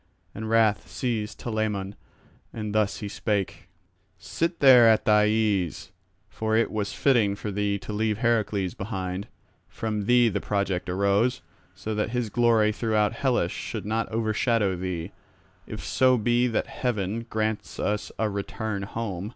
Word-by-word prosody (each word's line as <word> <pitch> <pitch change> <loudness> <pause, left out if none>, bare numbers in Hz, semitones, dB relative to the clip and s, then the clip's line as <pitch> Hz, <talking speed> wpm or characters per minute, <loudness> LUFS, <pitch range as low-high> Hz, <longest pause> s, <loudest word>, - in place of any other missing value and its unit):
And 110 +1 -5
wrath 110 -2 +2
seized 110 -4 -3
Telamon, 105 -4 -2 0.6
and 105 -2 -5
thus 105 -2 0
he 105 - -3
spake: 100 -1 -3 0.5
"Sit 170 +1 -2
there 125 -4 +8
at 110 - +3
thy 105 0 +5
ease, 105 -6 0 0.4
for 110 +2 -1
it 115 - +1
was 105 -2 -2
fitting 115 -8 +2
for 105 +1 -5
thee 100 0 0
to 105 - -7
leave 105 0 0
Heracles 105 -5 0
behind; 95 -1 -4 0.4
from 105 -2 -3
thee 120 +1 +5
the 110 - -1
project 100 -3 -1
arose, 100 +6 +1 0.3
so 100 +3 -4
that 105 0 -1
his 120 -2 -2
glory 115 -2 +3
throughout 110 -1 +1
Hellas 120 -8 0
should - - -5
not 110 +2 -1
overshadow 110 -2 +1
thee, 90 -2 -4 0.6
if - - -7
so 130 -1 +3
be 120 +2 +2
that 115 - 0
heaven 115 -1 -3
grants 110 -1 -2
us 105 0 -1
a 110 - +1
return 100 0 -4
home. 100 -2 -4
110 Hz, 150 wpm, -26 LUFS, 100-115 Hz, 0.6 s, there